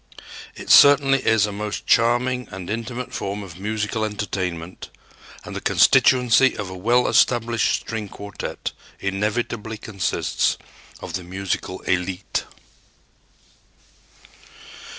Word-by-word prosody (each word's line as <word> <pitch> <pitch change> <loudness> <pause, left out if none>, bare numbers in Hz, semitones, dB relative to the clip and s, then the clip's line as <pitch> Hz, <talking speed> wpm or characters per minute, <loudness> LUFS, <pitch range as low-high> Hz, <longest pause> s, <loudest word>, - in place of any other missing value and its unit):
It - - -4
certainly 140 -1 +7
is 110 -3 +3
a 105 - -4
most 105 +1 -5
charming 120 +2 +2
and 95 0 -7
intimate 120 +3 -5
form 100 +1 -4
of 90 -2 -11
musical 110 +1 -2
entertainment 95 -5 -4 0.5
and - - -8
the - - -4
constituency 125 0 +4
of 100 -3 -5
a - - -7
well 120 +7 +2
established 120 -1 +2
string 110 -3 -5
quartet 100 +1 -6 0.3
inevitably 105 +3 -2
consists 100 -3 -1 0.4
of - - -7
the 90 - -4
musical 95 0 -4
élite. 90 +1 -2
105 Hz, 110 wpm, -22 LUFS, 95-120 Hz, 0.5 s, certainly